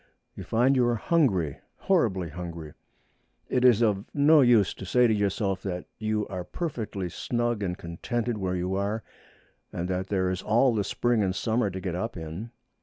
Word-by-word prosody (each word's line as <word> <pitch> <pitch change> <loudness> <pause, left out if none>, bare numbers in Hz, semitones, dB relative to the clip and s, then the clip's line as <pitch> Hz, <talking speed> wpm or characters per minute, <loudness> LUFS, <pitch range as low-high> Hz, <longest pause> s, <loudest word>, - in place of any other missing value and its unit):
You - - -8
find 125 +4 +2
you 125 - +3
are 120 - +2
hungry, 105 - +1 0.2
horribly 105 - +1
hungry. 85 -1 -7 0.8
It 125 - +1
is 120 -2 +6
of 100 -3 +1
no 150 +1 +6
use 120 -6 +4
to - - -10
say 125 +6 +3
to 115 - +3
yourself 100 -2 0
that 90 -2 -4
you 110 -1 -1
are 90 -2 -5
perfectly 110 - -4
snug 120 +5 -2
and 90 -2 -2
contented 110 +7 -3
where 95 -1 -1
you 90 +1 -2
are, 100 +3 -1 0.7
and 85 - -3
that 95 +1 -2
there 95 -2 0
is 95 0 -3
all 120 +5 +3
the 105 -2 0
spring 120 +2 +1
and 95 -2 0
summer 110 0 0
to 95 0 -6
get 95 -2 -3
up 105 +4 -3
in. 80 +8 -6
105 Hz, 180 wpm, -27 LUFS, 90-120 Hz, 0.8 s, is